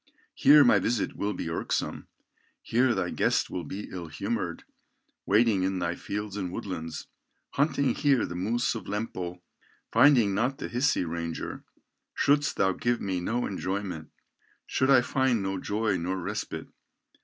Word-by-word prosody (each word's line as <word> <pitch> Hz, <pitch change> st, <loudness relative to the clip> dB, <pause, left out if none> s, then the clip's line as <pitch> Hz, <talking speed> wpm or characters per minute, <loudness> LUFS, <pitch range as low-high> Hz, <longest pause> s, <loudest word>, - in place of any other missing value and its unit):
Here 145 Hz, +1 st, +7 dB
my 115 Hz, -6 st, +5 dB
visit 110 Hz, +2 st, -1 dB
will 105 Hz, +1 st, -1 dB
be -, -, -5 dB
irksome, 80 Hz, -, -2 dB, 0.6 s
Here 120 Hz, +1 st, +2 dB
thy 90 Hz, -2 st, -1 dB
guest -, -, +1 dB
will 90 Hz, -, -3 dB
be 95 Hz, +7 st, -6 dB
ill 90 Hz, -3 st, -6 dB
humored, 95 Hz, 0 st, -3 dB, 0.6 s
Waiting 105 Hz, -1 st, +4 dB
in 95 Hz, 0 st, 0 dB
thy 85 Hz, -1 st, -1 dB
fields 105 Hz, +2 st, -5 dB
and 95 Hz, -4 st, -3 dB
woodlands, 80 Hz, -5 st, -5 dB, 0.5 s
Hunting 140 Hz, -3 st, +1 dB
here 140 Hz, -5 st, +2 dB
the -, -, -6 dB
moose 110 Hz, +7 st, 0 dB
of 115 Hz, -, -6 dB
Lempo, 90 Hz, -4 st, -4 dB, 0.5 s
Finding 120 Hz, -5 st, +5 dB
not 125 Hz, +7 st, 0 dB
the -, -, -5 dB
Hisi 125 Hz, -5 st, +1 dB
ranger, 85 Hz, 0 st, -4 dB, 0.5 s
Shouldst 145 Hz, +1 st, +2 dB
thou 95 Hz, -1 st, +3 dB
give 120 Hz, +5 st, 0 dB
me 95 Hz, -2 st, -2 dB
no 115 Hz, +7 st, -1 dB
enjoyment, 95 Hz, -4 st, -4 dB, 0.6 s
Should 130 Hz, -, 0 dB
I 130 Hz, -2 st, +7 dB
find 125 Hz, -3 st, +1 dB
no 95 Hz, 0 st, -2 dB
joy, 105 Hz, -1 st, 0 dB
nor 90 Hz, +3 st, -2 dB
respite. 90 Hz, -, -4 dB
100 Hz, 150 wpm, -28 LUFS, 90-120 Hz, 0.6 s, Here